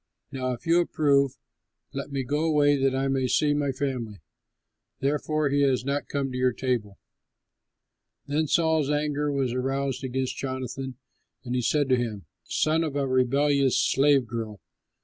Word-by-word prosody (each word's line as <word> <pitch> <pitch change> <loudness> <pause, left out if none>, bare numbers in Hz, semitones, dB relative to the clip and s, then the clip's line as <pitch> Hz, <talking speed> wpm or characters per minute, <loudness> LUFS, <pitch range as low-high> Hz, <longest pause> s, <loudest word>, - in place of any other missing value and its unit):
Now 130 -2 -2
if 120 - -9
you 170 +1 +4
approve, 140 -5 +2 0.6
let 140 +1 -5
me 135 -1 -1
go 145 +5 -1
away 145 -2 +4
that 135 -1 +1
I 135 +1 0
may 135 -1 +1
see 145 +3 +2
my 145 -1 0
family.' 125 -6 -4 0.8
Therefore, 150 +2 0
he 145 +1 +2
has 130 -3 +2
not 140 +1 -1
come 140 -2 -2
to 125 - -4
your 125 -1 +2
table." 115 -6 -2 1.3
Then 150 +2 0
Saul's 160 -2 +2
anger 150 0 0
was 135 -3 0
aroused 135 +1 -2
against 130 0 -2
Jonathan, 130 0 -4 0.5
and 125 -1 -4
he 125 - +1
said 145 +4 +1
to 130 - +4
him, 110 -7 -3 0.2
"Son 160 +2 +1
of 150 -3 -3
a 140 -1 0
rebellious 135 +1 +2
slave 140 -1 +3
girl! 110 -3 -5
135 Hz, 160 wpm, -26 LUFS, 130-145 Hz, 1.3 s, you